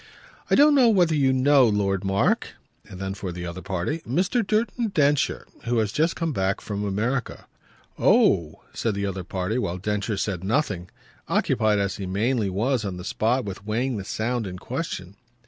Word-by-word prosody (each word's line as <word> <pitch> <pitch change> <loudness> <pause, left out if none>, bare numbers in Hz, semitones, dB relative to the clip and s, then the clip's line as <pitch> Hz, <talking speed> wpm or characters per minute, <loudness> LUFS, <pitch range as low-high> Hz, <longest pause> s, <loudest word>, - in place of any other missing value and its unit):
"I - - +4
don't 295 +2 +6
know 260 -4 +6
whether 180 -7 +3
you 140 -3 +3
know 130 0 +5
Lord 100 -2 0
Mark." 95 0 +1 0.4
And 90 - -9
then 95 0 -3
for 95 -2 -5
the 90 0 -6
other 85 +1 -6
party: 95 - -2
"Mr. 175 - -1
Merton 230 +2 +1
Densher 145 -7 +1 0.2
who 120 0 0
has 110 -3 +1
just 160 - +1
come 165 -2 -2
back 95 -2 0
from 105 -1 -4
America." 115 +6 -2 0.5
"Oh!" 80 -2 +3
said 115 -3 -1
the 100 0 -2
other 95 -1 -3
party 95 +6 -2
while 90 -6 -2
Densher 105 +2 -2
said 95 -3 -2
nothing 100 - -1 0.4
occupied 110 -1 +2
as 100 -1 -1
he 95 - -5
mainly 105 +3 0
was 115 +6 0
on 95 -3 -4
the 90 - -7
spot 120 +5 0
with 100 0 -6
weighing 115 +4 -1
the 100 - -4
sound 110 +3 -2
in 90 -1 -6
question. 100 - -5
105 Hz, 180 wpm, -24 LUFS, 95-135 Hz, 0.5 s, don't